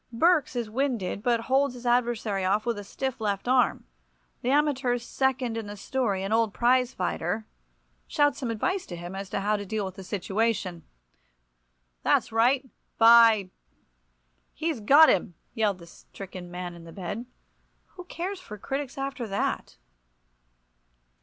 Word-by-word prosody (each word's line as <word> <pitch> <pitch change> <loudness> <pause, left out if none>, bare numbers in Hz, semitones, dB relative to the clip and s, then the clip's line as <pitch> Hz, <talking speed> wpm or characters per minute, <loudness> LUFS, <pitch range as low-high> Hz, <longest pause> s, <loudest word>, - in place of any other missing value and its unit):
Berks 310 +3 +3
is 240 -2 -2
winded, 230 -5 -2
but 235 0 +1
holds 270 +1 +1
his 245 0 -11
adversary 235 -5 +1
off 205 +4 +1
with 235 -3 -1
a - - -7
stiff 260 +4 -4
left 200 0 -2
arm. 255 0 +2 0.6
The 245 - -1
amateur's 265 -4 +1
second 260 -3 0
in 225 -2 -5
the 205 0 -7
story, 205 -5 -1
an 195 - -3
old 225 -2 +2
prize 250 +1 +3
fighter, 185 +3 -2 0.6
shouts 290 -2 +2
some 255 -4 -3
advice 365 - -1
to 175 - -6
him 175 +2 -7
as 195 0 -6
to 195 - -2
how 210 +1 +1
to 205 - -5
deal 210 +1 -2
with 190 - -6
the 195 - -8
situation. 195 -2 -1 1.2
"That's - - +2
right. 250 +4 +3 0.3
By 225 -4 +7 0.5
—— - - -44
he's 320 -5 0
got 285 +9 +7
him!" 175 -1 +1 0.2
yelled 210 -4 +1
the 170 - -13
stricken 185 +1 -10
man 180 0 -6
in 170 -1 -12
the 165 - -11
bed. 200 +6 -5 0.6
Who 360 -1 -11
cares 365 +3 -5
for 210 -13 -10
critics 270 +5 -4
after 270 -3 -4
that? 200 0 -2
225 Hz, 160 wpm, -27 LUFS, 195-260 Hz, 1.2 s, By